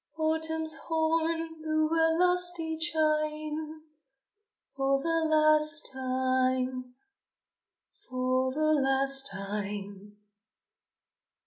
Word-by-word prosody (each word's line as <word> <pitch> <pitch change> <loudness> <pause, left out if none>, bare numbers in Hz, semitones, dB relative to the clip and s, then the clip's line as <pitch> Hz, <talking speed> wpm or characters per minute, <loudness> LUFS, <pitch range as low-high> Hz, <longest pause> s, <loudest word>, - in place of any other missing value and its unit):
Autumn's 320 0 +1
horn 325 0 -1
blew 310 0 0
a 325 0 +2
lusty 355 -2 +1
chime, 310 -1 -1 0.9
For 275 0 +1
the 330 +2 0
last 305 0 +3
time, 255 -1 -1 1.1
for 255 0 0
the 310 +3 +1
last 270 -1 +3
time! 200 0 -6
305 Hz, 75 wpm, -28 LUFS, 260-320 Hz, 1.1 s, last